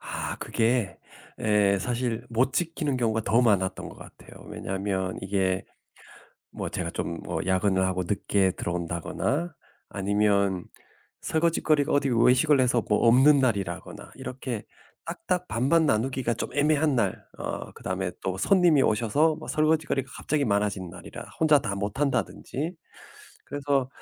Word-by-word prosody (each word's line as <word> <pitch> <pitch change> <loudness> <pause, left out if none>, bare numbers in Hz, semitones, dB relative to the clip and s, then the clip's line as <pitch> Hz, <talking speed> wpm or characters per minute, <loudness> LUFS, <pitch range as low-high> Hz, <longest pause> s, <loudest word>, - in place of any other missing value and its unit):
아, - - -4
그게 115 -3 0 0.4
예 105 -2 +3
사실 120 -1 -2
못 125 +3 +1
지키는 155 -3 -1
경우가 110 -2 0
더 115 +4 +3
많았던 95 -4 +1
것 - - -12
같아요. - - -14
왜냐면 95 -1 -3
이게 95 -1 0 0.9
뭐 - - -5
제가 85 -2 -3
좀 85 -1 -4
뭐 85 -2 -3
야근을 95 0 +2
하고 95 -1 -1
늦게 95 0 +1
들어온다거나 90 - -2 0.4
아니면 100 -2 +1 0.6
설거짓거리가 155 -2 +1
어디 140 -1 +2
외식을 130 +5 +4
해서 125 -2 +2
뭐 105 +2 +3
없는 135 +5 +6
날이라거나 100 -9 -2
이렇게 125 -4 -5 0.4
딱딱 180 -1 -2
반반 140 +8 +2
나누기가 125 0 0
좀 115 - -4
애매한 150 0 +2
날 105 -6 -1
어 - - -5
그다음에 95 -1 -3
또 95 0 -2
손님이 175 - +4
오셔서 120 +9 +2
뭐 155 - -10
설거짓거리가 155 -4 +1
갑자기 150 -1 0
많아진 100 -3 0
날이라 90 +1 -10
혼자 155 -3 +5
다 100 -5 -3
못 100 +5 -4
한다든지. 145 +3 -2 0.7
그래서 140 -2 -1
115 Hz, 305 characters per minute, -26 LUFS, 95-140 Hz, 0.9 s, 없는